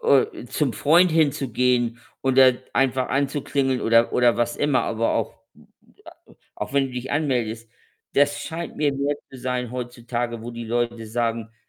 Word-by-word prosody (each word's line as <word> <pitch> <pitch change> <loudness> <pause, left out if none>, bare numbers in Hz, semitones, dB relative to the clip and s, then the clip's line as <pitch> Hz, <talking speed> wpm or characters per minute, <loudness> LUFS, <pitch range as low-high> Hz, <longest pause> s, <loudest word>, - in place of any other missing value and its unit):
o 465 -1 +4 0.2
zum 145 -5 -1
Freund 170 +8 +4
hinzugehen 125 -6 +1 0.2
und 130 -1 +1
da 130 -1 +8 0.2
einfach 130 -1 +1
anzuklingeln 135 -1 0
oder 115 +1 +3
oder 120 -1 +3
was 120 0 0
immer, 145 -3 +2
aber 115 0 0
auch 110 -1 -1 0.2
m - - -20 0.3
m - - -25
a - - -15 0.3
auch - - -5
wenn 140 -1 +3
du 130 - -10
dich 125 +1 -5
anmeldest, 120 -6 -1 0.5
das 145 0 +3
scheint 170 +1 -6
mir 145 -2 +1
mehr 140 +1 -1
zu 130 - -11
sein 125 -1 -3
heutzutage, 120 -1 -4
wo 120 - -6
die 120 0 -7
Leute 115 0 -2
sagen 115 0 -2
125 Hz, 170 wpm, -23 LUFS, 120-140 Hz, 0.5 s, da